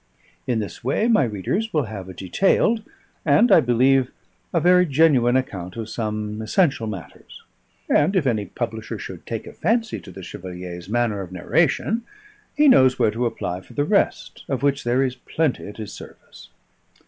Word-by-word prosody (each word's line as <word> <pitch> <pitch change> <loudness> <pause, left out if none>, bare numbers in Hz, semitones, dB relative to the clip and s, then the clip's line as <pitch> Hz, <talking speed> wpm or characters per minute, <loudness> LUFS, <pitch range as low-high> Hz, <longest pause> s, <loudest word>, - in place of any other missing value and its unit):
In 125 -3 +1
this 105 -2 -5
way 140 - +1
my 225 -7 +4
readers 120 - -2
will 150 -3 +1
have 100 -5 -7
a - - -8
detailed, 195 - +2 0.4
and, 165 +11 +4
I - - +8
believe, 130 +2 +3 0.4
a 170 - +2
very 180 +2 +5
genuine 135 -5 +4
account 95 -9 -2
of 115 -2 -5
some 105 -1 -3
essential 115 - +1
matters; 95 -7 -9 0.4
and 155 +7 +3
if 180 -6 +2
any 110 -5 0
publisher 110 -2 -5
should - - -9
take - - -4
a - - -10
fancy 225 +4 0
to - - -13
the 95 +1 -10
Chevalier's 90 0 -8
manner 115 -3 0
of 90 -2 -8
narration, 165 - +1 0.6
he 300 0 +5
knows 130 - +6
where 115 -4 +3
to 120 +2 -1
apply 90 -5 -4
for - - -16
the 145 - +1
rest, 200 +5 0
of 135 -1 -2
which 140 -2 +1
there 125 +3 +2
is 130 -1 -2
plenty 150 0 -2
at 105 - -10
his 105 -2 -7
service. - - -13
120 Hz, 175 wpm, -22 LUFS, 105-155 Hz, 0.6 s, I